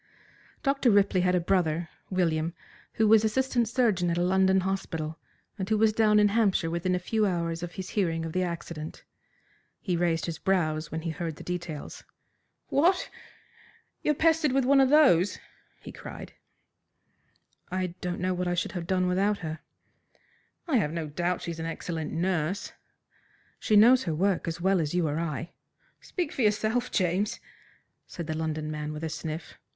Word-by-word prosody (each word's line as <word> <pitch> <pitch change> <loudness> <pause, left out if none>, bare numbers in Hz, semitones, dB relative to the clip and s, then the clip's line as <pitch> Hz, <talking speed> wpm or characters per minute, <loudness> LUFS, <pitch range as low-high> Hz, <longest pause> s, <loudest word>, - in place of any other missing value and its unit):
Dr. 275 -3 +2
Ripley 200 -3 +4
had 180 0 +2
a - - +3
brother, 170 -2 0 0.2
William, 165 -3 0 0.4
who 220 - +2
was 220 0 +6
assistant 240 0 +1
surgeon 215 -8 +2
at 170 - 0
a 175 - +2
London 190 +1 +3
hospital, 165 -4 -3 0.4
and 190 +1 -3
who 220 - +3
was 215 0 +3
down 210 -1 +4
in 205 0 +5
Hampshire 200 -6 +2
within 180 +2 0
a - - +1
few 215 +5 -1
hours 170 -2 -2
of 175 0 -6
his 190 - -6
hearing 165 -5 0
of 160 - -5
the 185 - +1
accident. 170 -3 -5 0.8
He 180 -4 -1
raised 165 -1 +1
his 165 -1 -5
brows 160 -5 0
when 160 - -3
he 165 0 -3
heard 160 0 -4
the - - -11
details. 175 -4 -6 0.7
"What! 345 +7 +2 0.9
You - - -1
are - - -9
pestered 320 -2 +3
with 270 -1 +2
one 275 +1 +5
of 265 - +4
those!" 265 - +5 0.4
he - - -10
cried. - - -9 1.4
"I 185 -1 -2
don't 180 -1 -3
know 185 +1 0
what 180 0 -2
I 175 - 0
should 175 - -1
have 175 -2 -5
done 185 -1 +1
without 195 +3 +1
her." 160 0 -4 1.1
"I've 230 - +2
no 165 -1 -3
doubt 175 +4 -1
she's 170 -1 -5
an 165 - -3
excellent 165 -1 -4
nurse." 175 +1 -1 0.9
"She 215 - +1
knows 245 +5 +6
her 165 -3 -1
work 190 +1 +1
as 165 +1 -3
well 190 0 +2
as 155 +2 -2
you 175 -3 +2
or 150 +2 -1
I." 165 0 -3 0.5
"Speak 350 -5 -4
for - - -3
yourself, 220 +3 +1
James," 185 +3 0 0.7
said 170 - -6
the 155 - -3
London 155 -1 -3
man 150 0 -4
with 150 +1 -7
a - - -1
sniff. 155 +1 -6
180 Hz, 175 wpm, -28 LUFS, 165-210 Hz, 1.4 s, was